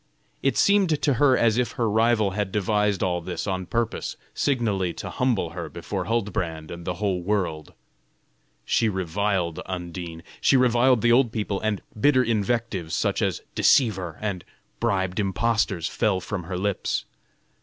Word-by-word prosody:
It - - +1
seemed 195 -7 +3
to 145 - +2
her 130 +1 +4
as 115 0 +3
if 125 - -1
her 115 - 0
rival 110 -1 +2
had 100 -1 -2
devised 105 0 +1
all 90 -2 0
this 85 0 -4
on 95 -2 -3
purpose 115 -1 -2 0.2
signally 105 -10 0
to - - -6
humble 120 -10 0
her 85 0 -6
before - - -4
Huldbrand 90 -8 -2
and 85 0 -8
the 90 - -2
whole 95 -2 -1
world. 85 -6 -2 0.9
She 115 - +2
reviled 95 -2 -1
Undine, 85 -2 -6 0.2
she 135 - +5
reviled 125 -1 +4
the 120 - +5
old 120 -1 +4
people, 105 -3 -2
and 110 -2 -1
bitter 130 +3 +4
invectives, 110 -6 -1
such - - 0
as - - -1
"deceiver" 95 - +2
and 100 -4 -3 0.4
"bribed 95 -4 0
impostors," 100 -3 0
fell 100 -3 0
from 95 -2 -5
her 90 +1 -4
lips. 100 +1 -1
105 Hz, 155 wpm, -25 LUFS, 90-115 Hz, 0.9 s, she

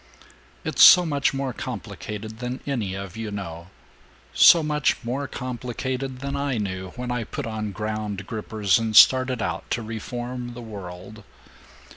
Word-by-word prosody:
"It's - - 0
so 180 -1 +9
much 145 -4 +1
more 135 -1 -3
complicated 110 0 -7
than 125 +1 -4
any 115 -9 -2
of 95 0 -7
you 110 -1 -5
know 85 -5 -6 0.7
so 170 -2 +7
much 150 -1 +1
more 135 +4 -3
complicated 130 +1 -4
than 140 0 -3
I 140 -3 -1
knew 95 -3 -3
when 125 0 -4
I 125 -1 -1
put 145 +5 -5
on 110 -2 -4
Ground 105 -1 -4
Grippers 105 -1 0
and 110 -1 -2
started 130 -2 +6
out 85 +1 -4
to 120 - -1
reform 120 +2 -5
the 120 - -8
world. 100 0 -9
115 Hz, 150 wpm, -24 LUFS, 105-130 Hz, 0.7 s, so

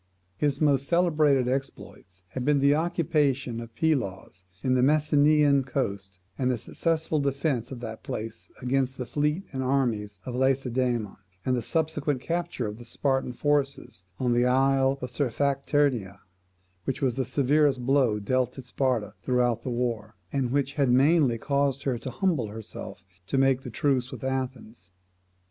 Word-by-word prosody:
His 145 +5 0
most 140 -3 +2
celebrated 155 -7 +3
exploits 125 -8 -5
had 125 +5 -4
been 145 +2 +3
the 140 +1 +4
occupation 150 -7 0
of 115 -1 -11
Pylos 100 - -1 0.2
on 130 - +2
the 130 - +3
Messenian 150 0 +4
coast, 100 -8 -3 0.2
the 125 -2 +1
successful 160 +5 -1
defence 140 -3 -1
of 125 -2 -7
that 110 -2 -6
place 110 +1 -6
against 130 +1 0
the 125 - -4
fleet 150 +7 0
and 130 - -2
armies 120 -6 0
of 125 - -5
Lacedaemon, 125 -4 0 0.3
and 130 - +2
the 120 - -1
subsequent 150 0 -1
capture 170 +2 -2
of 105 +1 -5
the - - -9
Spartan 135 +2 -1
forces 140 - -1
on 125 -2 +1
the 120 +1 +3
isle 135 +1 +3
of 125 - -4
Sphacteria; 140 -4 0 0.6
which 135 - -2
was 130 -3 +1
the 135 - 0
severest 135 0 +2
blow 130 -5 +3
dealt 125 +4 0
to 130 - -9
Sparta 125 -4 -1
throughout 120 -2 +1
the 130 - -4
war, 115 -3 -2 0.2
and 135 -3 0
which 140 +1 0
had 140 -3 +1
mainly 135 -1 +4
caused 140 +1 0
her 125 -4 -1
to 130 - -6
humble 160 - 0
herself 105 -4 -9 0.2
to 135 - -1
make 135 -1 +3
the 125 - -7
truce 130 +1 0
with - - -8
Athens. 125 -7 -4
130 Hz, 155 wpm, -27 LUFS, 120-140 Hz, 0.6 s, the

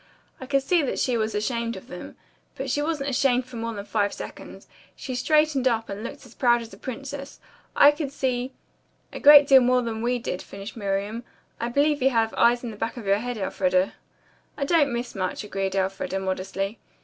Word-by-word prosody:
I 260 - -8
could 275 0 +1
see 340 +5 +3
that 275 - -2
she 250 - +1
was 220 -1 -1
ashamed 230 +2 -1
of 190 - -10
them. 180 - -9 0.4
But - - -4
she 290 - 0
wasn't 295 -3 -1
ashamed 255 -1 +2
for 250 -2 -10
more 230 0 -4
than 200 0 -6
five 205 -2 0
seconds. - - -9 0.3
She 260 - -6
straightened 300 0 +2
up 225 -2 0
and 200 +2 -5
looked 235 - -8
as 240 - -15
proud 240 -1 +3
as 225 - -12
a - - -11
princess. 275 +2 -7 0.4
I 285 - +8
could 295 -2 -4
see 255 -2 -2 0.3
" - - -35
"A - - -6
great 290 0 +9
deal 270 -2 +8
more 250 0 +3
than 225 -1 -4
we 245 +1 +1
did," 230 -6 -4
finished 195 +2 -9
Miriam. 205 +2 -2 0.4
"I 235 - -2
believe 285 +3 +2
you 265 - +5
have 225 -3 +1
eyes 240 +1 +3
in 235 - -4
the 210 - -11
back 225 +3 -3
of 230 - -7
your 200 +1 +3
head, 245 +1 -4
Elfreda." 185 -1 +1 0.6
"I 280 - -1
don't 290 -3 +3
miss 240 +1 -3
much," 185 0 -3
agreed 195 -2 -3
Elfreda 195 0 -1
modestly. 190 +2 -3
240 Hz, 210 wpm, -25 LUFS, 205-270 Hz, 0.6 s, great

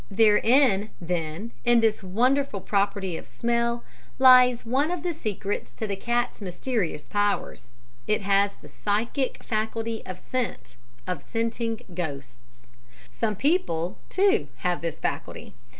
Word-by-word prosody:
"Therein 215 +1 +4
then 170 +4 -3
in 240 0 +5
this 225 -2 +2
wonderful 245 +5 +1
property 195 -2 0
of - - -10
smell 235 0 0 0.3
lies 250 -2 +7
one 270 +7 +1
of 350 -2 -3
the 350 -1 -1
secrets 205 - -3
to 220 - -4
the 200 -2 -2
cat's 240 +3 -1
mysterious 185 - -2
powers, 205 -11 -1 0.4
it 210 - +2
has 200 0 +2
the - - -15
psychic 230 +6 -1
faculty 225 +1 -2
of 185 - -6
scent 230 - -4 0.3
of 180 -5 -3
scenting 230 +2 -2
ghosts. 125 -7 -7 0.5
Some 215 - -1
people, 200 - 0
too, 405 +3 +3 0.2
have 180 -1 +1
this 165 -2 -4
faculty. - - -4
215 Hz, 130 wpm, -26 LUFS, 185-240 Hz, 0.5 s, lies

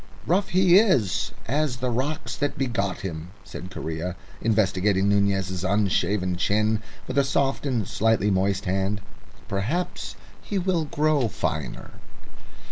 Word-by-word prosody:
"Rough 190 +4 +2
he 185 0 +6
is 130 - +2 0.2
as 140 0 0
the 125 0 -1
rocks 135 +6 -2
that 145 -1 -2
begot 115 -8 -1
him," 85 -2 -5
said 90 - -8
Correa, 85 -1 -4 0.3
investigating 100 -2 +2
Nunez's 95 -2 +1
unshaven 100 -2 +1
chin 105 +3 +1 0.2
with 130 +2 0
a - - +4
soft 135 +1 0
and 115 -8 0
slightly 110 -1 +2
moist 95 +1 +1
hand. 95 +2 0 0.5
"Perhaps 170 - -2 0.3
he 205 - -3
will 180 -3 +1
grow 150 -3 +2
finer." 80 - -3
105 Hz, 125 wpm, -25 LUFS, 95-140 Hz, 0.5 s, he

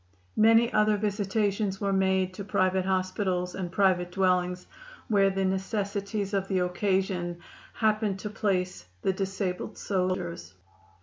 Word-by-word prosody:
Many 225 +2 +5
other 215 0 +3
visitations 205 -1 0
were 200 -1 0
made 190 -1 +2
to 200 - -6
private 185 -1 +1
hospitals 185 -1 -1
and 180 -2 -4
private 180 -2 +2
dwellings, 180 -1 +1 0.4
where 200 -2 +4
the 195 0 -1
necessities 200 +1 -2
of 195 -1 0
the 190 - 0
occasion 180 -1 0 0.4
happened 215 -2 +1
to 210 - -5
place 185 - -1 0.2
the 190 - +2
disabled 195 +1 -3
soldiers. 180 - -2
190 Hz, 125 wpm, -28 LUFS, 185-205 Hz, 0.4 s, Many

